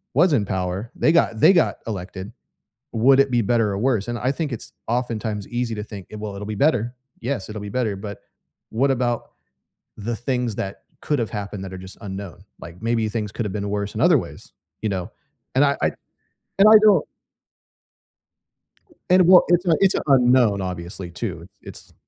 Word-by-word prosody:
was 165 +3 +4
in 120 -7 +3
power? 95 +5 -3
They - - +3
got 115 -9 +2
they 195 - +7
got 170 - +2
elected. 95 +1 -6 0.6
Would 130 +4 +4
it 140 0 +4
be 120 -1 +3
better 115 -1 +1
or 100 - -2
worse? 115 -3 0
And 120 - -2
I 130 +4 +1
think 150 0 -3
it's 120 - -7
oftentimes 115 -4 -2
easy 120 -1 -2
to 105 - -4
think, 100 -3 -10
“Eh, - - -8
well, 105 -2 -6
it'll 100 +1 -6
be 105 0 -4
better. 120 -5 0 0.3
Yes, 125 -4 -3
it'll 105 -1 -6
be 105 - -6
better,” 110 -5 0
but 100 0 -7 0.5
what 135 +5 +1
about 120 -2 -1 0.7
the 110 +3 -3
things 125 -2 -2
that 95 0 -5 0.2
could've 130 -7 -1
happened 100 -2 -5
that 95 - -8
are 95 - -7
just - - -13
unknown? 95 -3 -7 0.2
Like, 85 +2 -11
maybe 115 -1 0
things 105 -1 -3
could've 105 -4 -3
been 100 -1 -3
worse 100 0 -3
in - - -3
other - - +6
ways, - - -9 0.3
you 110 - 0
know? 95 -3 -3 0.5
And 140 - +6
I 140 - +3
I - - +2 0.7
and 195 - +7
I 220 - +8
don't 210 -2 +5 2.0
And 185 -1 +6
what 180 0 +8
it's 175 +1 +3
a 165 -3 +4
it's 195 -1 +4
a - - 0
unknown, 125 -6 +4
obviously, 90 0 -6
too. 85 - -5
It's - - -13
110 Hz, 190 wpm, -22 LUFS, 100-125 Hz, 2.0 s, I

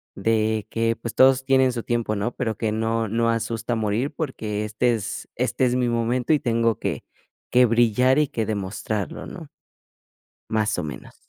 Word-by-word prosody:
de 110 +1 +1
que, 115 0 +1
pues, 115 0 -6
todos 130 0 +5
tienen 130 -1 +4
su 120 -2 -4
tiempo, 115 -2 -1
¿no? 105 +4 -1
Pero 110 -4 -2
que 110 -2 -1
no 115 +1 0
no 115 +2 +1
asusta 115 0 -1
morir 110 +6 -1
porque 110 -9 -3
este 110 +3 +1
es 105 -3 -5
este 130 - 0
es 125 0 +1
mi 125 -1 +1
momento, 120 +4 +1
y 150 - +3
tengo 115 -3 +1
que - - -3 0.5
que 125 0 +6
brillar 120 +3 +3
y 150 - +3
que 115 -4 -2
demostrarlo, 100 0 -3
¿no? - - -9 1.0
Más 110 -1 +1
o - - -1
menos. 75 -1 -8
115 Hz, 175 wpm, -23 LUFS, 110-125 Hz, 1.0 s, que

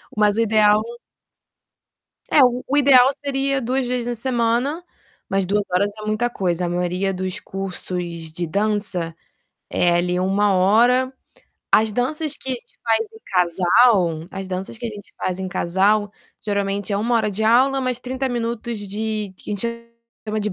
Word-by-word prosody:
Mas 210 0 +3
o - - +3
ideal 215 -1 +4 1.5
É, 290 - +7
o 250 0 +2
o 285 - +1
ideal 265 -3 +7
seria 275 -1 0
2 255 +2 0
vezes 245 -1 -2
na 240 - -2
semana, 245 +6 0 0.5
mas 195 0 +1
2 205 +2 0
horas 200 +3 +1
é - - -7
muita 215 +3 0
coisa. 180 -5 -1
A - - -2
maioria 180 +2 -1
dos 185 0 -4
cursos 180 -4 -5
de 170 +1 -4
dança 200 -3 -1 0.6
é, 175 -1 +2
ali, 180 +1 +1
1 195 +2 +2
hora. 240 +8 +4 0.6
As 220 0 +4
danças 295 +5 -1
que - - -9
a - - +2
gente 240 - -13
faz 225 -1 +1
em 220 - -15
casal 180 -1 +3
as 195 -1 -6
danças 190 +4 -5
que 235 - -5
a - - -3
gente 205 -2 -12
faz 185 0 -3
em 190 - -4
casal, 195 +3 +1 0.3
geralmente, 200 0 -2
é - - +1
1 230 +4 0
hora 220 -2 +2
de 210 +2 -2
aula, 260 +4 +4
mais 255 -2 -2
30 260 +1 -3
minutos 235 -1 -3
de 210 0 -3
que - - -10
a - - 0
gente 235 +3 -3 0.4
chama 215 0 -2
de 210 0 -2
210 Hz, 170 wpm, -21 LUFS, 190-240 Hz, 1.5 s, É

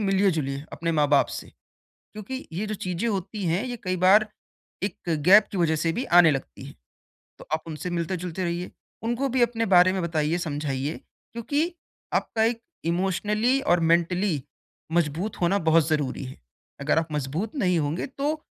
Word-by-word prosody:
मिलिए-जुलिए, 170 -9 +1
अपने 165 +1 -2
माँ-बाप 145 -2 +3
से। - - -7 0.7
क्योंकि 235 +6 -7
ये 200 +6 -3
जो 215 - -3
चीज़ें 180 +4 -2
होती 200 0 -3
हैं 175 +8 0
ये 245 -1 -4
कई 185 0 0
बार 210 +3 +6 0.6
एक 200 - -1 0.3
गैप 205 +3 +8
की 190 - -2
वजह 160 -2 +2
से 165 +1 0
भी 250 - -2 0.2
आने 160 -2 +6
लगती 135 - -5
है। - - -11 0.6
तो - - -13
आप 160 - 0
उनसे 160 +3 -5
मिलते-जुलते 175 +1 -3
रहिए, 175 +1 -3 0.3
उनको 240 +4 -1
भी 250 0 +1
अपने 230 -1 +2
बारे 180 +1 +6
में 190 - -1
बताइए, 160 0 0
समझाइए 145 -3 -3 0.4
क्योंकि 290 +9 -1 0.4
आपका 220 -1 +1
एक 230 0 0 0.2
इमोशनली 210 +8 +1
और 175 -6 +3
मेंटली 170 -1 +1 0.5
मज़बूत 170 +5 -1
होना 185 +4 +3
बहुत 160 -1 +4
ज़रूरी 145 -4 -1
है। 130 - -9 0.4
अगर 150 +2 +1
आप 160 - -3
मजबूत 150 - -3
नहीं 180 -9 +2
होंगे 150 +4 -1
तो 295 +4 -3
180 Hz, 165 wpm, -25 LUFS, 160-215 Hz, 0.7 s, गैप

